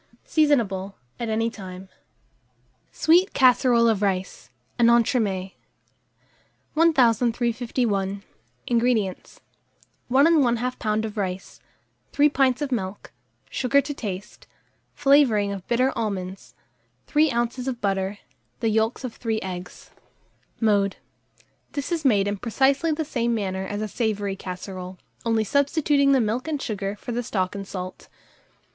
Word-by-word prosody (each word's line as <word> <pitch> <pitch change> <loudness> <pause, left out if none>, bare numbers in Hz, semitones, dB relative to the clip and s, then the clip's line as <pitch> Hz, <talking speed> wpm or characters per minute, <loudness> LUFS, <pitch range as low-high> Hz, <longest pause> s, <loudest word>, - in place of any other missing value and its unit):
Seasonable 220 - +1 0.2
at 235 -2 -3
any 225 +1 0
time. 190 -3 -9 1.0
SWEET 350 +4 +3
CASSEROLE 245 -2 +5
OF 220 -3 +2
RICE 190 -2 -2 0.3
(an 235 0 +6
Entremets). 215 -5 +1 1.2
1351. 235 - +1 0.4
INGREDIENTS. 230 -5 0 0.7
1 265 +3 +4
1/2 285 -8 +4 0.2
lb. 215 -1 -1
of 215 0 -7
rice, 190 -2 -4 0.5
3 295 +1 +5
pints 270 -1 +2
of 280 - -4
milk, 195 -5 -4 0.4
sugar 270 +2 +2
to 285 +1 -3
taste, 200 -6 -7 0.5
flavouring 275 -8 +4
of 195 -2 -7
bitter 255 +2 +2
almonds, 190 - -4 0.5
3 300 0 +3
oz. 240 +2 -2
of 250 -3 -3
butter, 195 -1 -1 0.4
the 225 - +1
yolks 220 +4 0
of 250 -3 -4
3 225 -2 -2
eggs. 180 -1 -8 0.7
Mode. 205 -3 +2 0.8
This 285 +3 -4
is 335 -3 -1
made 205 -7 +3
in 205 0 -1
precisely 270 - +1
the 310 +1 -1
same 235 -4 -1
manner 190 -2 -3
as 205 +2 -3
a - - -2
savoury 205 -3 -2
casserole, 185 0 -7 0.3
only 225 -1 +2
substituting 280 +3 +2
the 270 - +5
milk 230 +5 -1
and 305 -2 -2
sugar 205 -5 -3
for 240 - -7
the 240 +1 -1
stock 190 -5 -2
and 200 -1 -6
salt. 185 -1 -7
225 Hz, 125 wpm, -24 LUFS, 195-260 Hz, 1.2 s, an